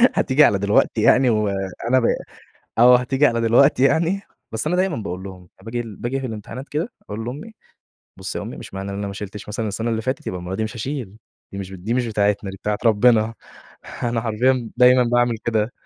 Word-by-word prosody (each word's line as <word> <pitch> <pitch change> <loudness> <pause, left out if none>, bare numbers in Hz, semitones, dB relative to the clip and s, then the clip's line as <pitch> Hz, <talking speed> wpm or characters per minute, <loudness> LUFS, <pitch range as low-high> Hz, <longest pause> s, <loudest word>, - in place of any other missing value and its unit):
حتيجي 140 +3 +4
على 100 -8 +4
دلوقتي 105 +2 +2
يعني 125 +3 +5
و 105 -2 +1 0.4
أنا 130 +1 +5
ب - - -3 0.8
أو 125 +1 +8
حتيجي 135 +3 +2
على 115 -4 +1
دلوقتي 125 +4 +4
يعني، 170 +7 +2 0.3
بس 110 +6 -3
أنا 180 - +1
دايمًا 185 -2 +1
باقول 95 -4 -5
لهم، 95 -1 -9
أنا 95 +2 -22
باجي 120 0 -2 0.2
باجي 135 +3 -2
في 130 - -4
الامتحانات 115 +4 -7
كده 160 +10 -3
أقول 110 +2 -6
لأمي: 150 - -7 0.7
"بُصي - - -4
يا - - -5
أمي - - -7
مش - - -10
معنى 95 +1 -5
إن - - -5
أنا 100 - -3
ما 100 - -5
شيلتش 105 +1 -8
مثلًا 110 +1 -3
السنة 115 +3 -2
اللي 115 0 -1
فاتت، 130 +3 -3
يبقى 90 - -3
المرة 90 +2 -5
دي 110 - -1
مش 110 +1 -6
هاشيل، 120 -4 -5 0.4
دي 100 - -6
مش 95 -1 -6
دي 95 +5 -3
مش 125 -1 0
بتاعتنا 105 -2 0
دي 95 - -9
بتاعة 105 +1 -2
ربنا" 115 0 +4 0.7
أنا 120 -1 0
حرفيًا 120 +2 0
دايمًا 125 0 +6
باعمل 120 -1 +1
كده، 110 0 0
115 Hz, 210 wpm, -21 LUFS, 105-130 Hz, 0.8 s, أو